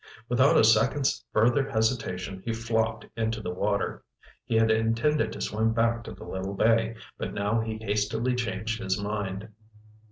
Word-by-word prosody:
Without 130 +3 +4
a - - +6
second's 115 +5 +3
further 120 +5 +3
hesitation, 100 -5 -1
he 115 - -2
flopped 115 -1 -1
into 110 0 -1
the 90 -4 -4
water. 100 +2 -1 0.4
He 120 -2 -1
had 110 0 +4
intended 115 +7 +1
to - - -7
swim 110 +1 0
back 115 0 +1
to - - -7
the - - -10
little 95 +1 -4
bay, 115 +2 +2 0.2
but - - -4
now 105 +3 +1
he 110 -1 -3
hastily 110 +3 0
changed 115 -1 -2
his 95 -1 -1
mind. 100 0 -3
110 Hz, 160 wpm, -27 LUFS, 105-115 Hz, 0.4 s, a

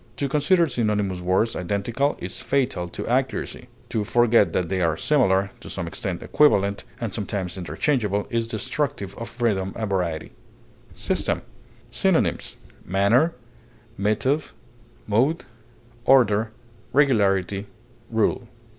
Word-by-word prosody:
To 140 - -1
consider 165 +5 +3
synonymous 105 -7 -1
words 95 +6 +1
identical 105 +10 -1
is 90 +1 -5
fatal 125 -11 0
to - - -6
accuracy; 130 +2 -1 0.2
to 110 - -1
forget 120 -1 +4
that 90 - 0
they 95 +1 -1
are 80 -2 +1
similar, 100 - +2
to - - -10
some - - -4
extent - - -4
equivalent, 100 -9 +3
and 115 -5 -3
sometimes 100 -4 -3
interchangeable, 100 - 0
is 115 -1 0
destructive 125 -2 -2
of 115 - -6
freedom 100 -6 -1
and 110 - -2
variety. 90 -5 -2 0.6
SYSTEM. - - -1 0.5
Synonyms: - - +1 0.3
manner, 115 - +3 0.6
method, 110 +9 +1 0.6
mode, 135 +10 +1 0.6
order, 110 -5 +4 0.4
regularity, 100 -8 +2 0.4
rule. 115 +1 0
110 Hz, 115 wpm, -24 LUFS, 95-130 Hz, 0.6 s, forget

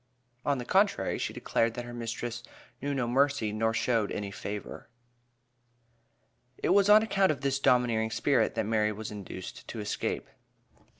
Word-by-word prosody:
On 140 -1 +1
the 125 - -5
contrary, 190 - +2
she - - -2
declared 115 0 0
that 120 - -5
her 120 - -8
mistress 120 0 -4 0.4
"knew 145 +2 -2
no 125 -3 0
mercy 135 -3 +2
nor 110 +1 +1
showed 115 -2 +1
any 100 -1 -4
favor." 105 +2 -7 1.7
It - - -1
was 200 +2 +5
on 215 +1 +8
account 195 -4 +2
of 140 -3 -4
this 135 -1 0
"domineering 120 -4 +3
spirit," 125 +4 +1
that 110 -2 0
Mary 105 -1 +1
was 105 +1 -6
induced 95 -3 -8
to 115 - -6
escape. 105 0 -2
120 Hz, 160 wpm, -29 LUFS, 110-140 Hz, 1.7 s, on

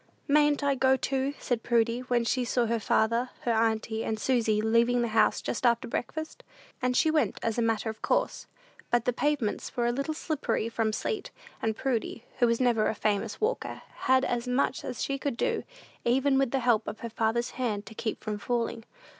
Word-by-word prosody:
"Mayn't 295 0 +3
I 280 0 +3
go, 265 0 +3
too?" 270 +1 -1
said 240 -3 -2
Prudy, 235 0 +2
when 245 -1 0
she 250 +2 +1
saw 245 0 +1
her 230 0 0
father, 230 +4 +1
her 240 - 0
auntie, 220 0 +1
and 220 - -2
Susy 225 -4 +2
leaving 230 +2 +3
the 235 - -1
house 220 0 +3
just 235 - -3
after 235 -1 +3
breakfast. 315 +7 -4 0.4
And 250 0 +1
she 315 - +4
went, 310 -1 +1
as 230 +1 0
a - - +3
matter 225 -1 0
of 220 0 -5
course; - - 0 0.4
but 240 -1 +2
the 250 - +2
pavements 275 -6 -1
were 240 - +2
a 240 - +2
little 275 +5 -2
slippery 305 -8 -1
from 225 -1 0
sleet; 405 - -3 0.3
and 220 -1 -1
Prudy, 245 -3 -2
who 240 - +5
was 230 0 +1
never 235 -4 +3
a - - -1
famous 210 +1 -1
walker, 455 +3 -2 0.2
had 260 0 +5
as 240 0 -1
much 255 +1 0
as 245 - -4
she 275 0 -2
could 270 -4 -2
do, 470 -3 0 0.4
even 270 +3 +3
with 270 -2 +2
the 270 +1 0
help 235 -3 +2
of 210 +1 -6
her 235 - -4
father's 230 +2 0
hand, 215 -5 -2
to - - -10
keep 220 0 -4
from 210 -1 -3
falling. 230 0 -2
240 Hz, 205 wpm, -28 LUFS, 225-265 Hz, 0.4 s, who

